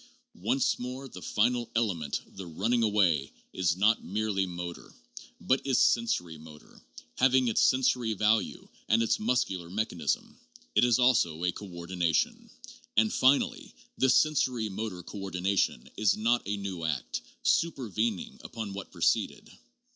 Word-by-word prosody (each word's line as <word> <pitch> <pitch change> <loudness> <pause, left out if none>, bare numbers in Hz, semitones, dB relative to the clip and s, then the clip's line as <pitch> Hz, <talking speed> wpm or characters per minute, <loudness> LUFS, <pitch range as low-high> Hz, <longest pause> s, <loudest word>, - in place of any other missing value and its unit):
Once 120 +9 0
more, 125 +2 -6
the 90 - -11
final 120 +4 0
* - - -34
element,' 90 -11 -1
the 95 -2 -7
running 110 +9 0
away, 95 -10 +2 0.2
is 90 -2 0
not 105 +4 +3
merely 100 0 -1
motor, 85 -1 -7 0.4
but 130 +1 +1
is 135 -2 +1
sensori 90 -9 +1
motor, 75 -1 -15 0.4
having 130 -1 +4
its 115 - +2
sensory 125 -3 +2
value 105 0 0 0.2
and 115 +1 +4
its 115 - +1
muscular 105 -7 -1
mechanism. 225 - -2 0.3
It - - +4
is 120 -1 +4
also 110 -11 +2
a 90 - +2
coordination. 85 -3 -2 0.5
And, 110 0 +4
finally, 130 +2 +2 0.2
this 130 0 +3
sensori 130 -8 +1
motor 95 -3 -5
coordination 95 -8 -1
is 105 -2 +2
not 115 +3 +2
a 100 0 -1
new 95 -4 -5
act, 75 -6 -2 0.2
supervening 115 - 0
upon 110 -4 -6
what 100 0 -7
preceded. 85 -2 0
105 Hz, 135 wpm, -29 LUFS, 90-120 Hz, 0.5 s, having